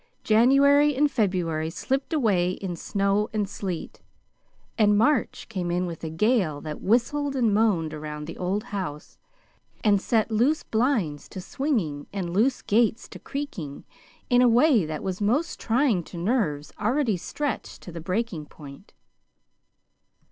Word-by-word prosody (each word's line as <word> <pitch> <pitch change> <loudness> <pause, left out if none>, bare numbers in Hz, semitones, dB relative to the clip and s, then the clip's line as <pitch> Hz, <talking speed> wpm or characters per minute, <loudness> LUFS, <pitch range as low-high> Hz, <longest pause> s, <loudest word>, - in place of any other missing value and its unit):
January 280 +6 +5
and 290 +2 +2
February 175 - 0
slipped 270 - -2
away 200 - +2
in 185 -3 -5
snow 200 +4 0
and 210 -2 0
sleet, 190 -4 -6 0.7
and 210 -2 +4
March 270 +4 +1
came 185 -5 -3
in 180 +1 0
with 170 -2 -7
a 160 - -3
gale 175 - +1
that 150 0 -7
whistled 275 +6 +1
and 235 -5 +2
moaned 195 -8 +2
around 150 0 -6
the 165 - -7
old 190 +4 -1
house, 185 -11 -6 0.6
and 205 -3 +4
set 225 0 +1
loose 250 +8 +2
blinds 220 - 0
to - - -7
swinging 185 - -2
and 185 -4 -4
loose 240 +7 +1
gates 225 +2 +1
to - - -11
creaking 215 - -6 0.4
in 245 -1 +4
a 250 - +6
way 240 - +4
that 155 -1 -5
was 190 +1 -3
most 250 +11 0
trying 230 -6 +1
to 175 - -10
nerves 170 - -1
already 235 0 +1
stretched 275 +10 -4
to 175 - -9
the 165 0 -7
breaking 180 -3 -3
point. 145 +6 -13
205 Hz, 150 wpm, -25 LUFS, 170-245 Hz, 0.7 s, a